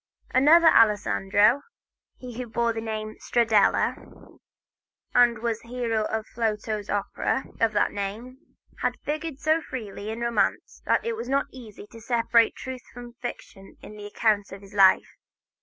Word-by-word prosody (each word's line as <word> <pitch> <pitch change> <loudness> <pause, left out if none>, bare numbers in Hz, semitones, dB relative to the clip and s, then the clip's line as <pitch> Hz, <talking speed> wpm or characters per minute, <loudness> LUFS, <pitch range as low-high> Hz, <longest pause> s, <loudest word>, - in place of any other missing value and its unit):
Another 320 +5 +6
Alessandro, 210 +1 +3 0.6
he 250 -2 -9
who 250 - -4
bore 230 +1 0
the 225 - -4
surname 215 -1 -5
Stradella 220 -4 0 0.7
and 240 -1 +4
was 225 0 -2
the 230 - -19
hero 230 -3 -1
of 220 0 -3
Flotow's 215 -2 -3
opera 205 +6 -1 0.2
of 225 -1 +2
that 205 - +2
name, 220 +7 -7 0.2
has - - 0
figured 305 -1 -4
so 315 +2 +1
freely 215 -7 -7
in 225 +2 -5
romance 235 0 -1
that - - +1
it 465 - -1
is 250 - -6
not 275 +1 +1
easy 225 -6 -11
to 230 - -12
separate 230 0 +2
truth 260 -1 -7
from 240 -1 -11
fiction 195 -5 -9
in 210 0 -11
accounts 205 0 0
of 195 0 -9
his 200 +1 -15
life. 195 -2 +4
230 Hz, 150 wpm, -25 LUFS, 210-245 Hz, 0.7 s, Another